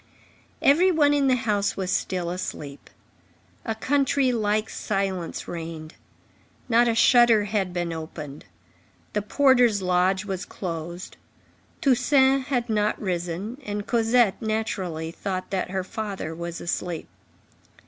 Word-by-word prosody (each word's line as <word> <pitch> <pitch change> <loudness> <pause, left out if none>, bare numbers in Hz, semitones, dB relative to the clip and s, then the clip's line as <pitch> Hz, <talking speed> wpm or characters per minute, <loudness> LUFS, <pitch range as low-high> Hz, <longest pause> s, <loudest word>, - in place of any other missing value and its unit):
Every 330 +7 +5
one 300 -4 +4
in 285 -1 +2
the 260 - +4
house 210 -4 0
was 190 -1 -2
still 175 -2 -1
asleep. 150 -6 -6 0.7
A 225 - -2
country 275 +1 +2
like 215 -2 0
silence 195 -4 -3
reigned. 165 -1 -6 0.7
Not 240 0 +4
a 230 - +1
shutter 235 -2 +5
had 200 -3 -1
been 175 -1 -2
opened. 155 -3 -8 0.7
The 210 - 0
porter's 245 -3 +3
lodge 185 +2 +2
was 190 -2 -3
closed. 170 0 -6 0.6
Toussaint 265 +1 +3
had 245 -4 0
not 210 -2 0
risen, 185 - -3
and 205 -2 -4
Cosette, 230 -2 +2
naturally, 190 -7 -2
thought 185 +1 -4
that 190 -2 -1
her 190 0 -2
father 195 -5 -5
was 170 +1 -6
asleep. 175 -1 -3
205 Hz, 125 wpm, -25 LUFS, 175-240 Hz, 0.7 s, Every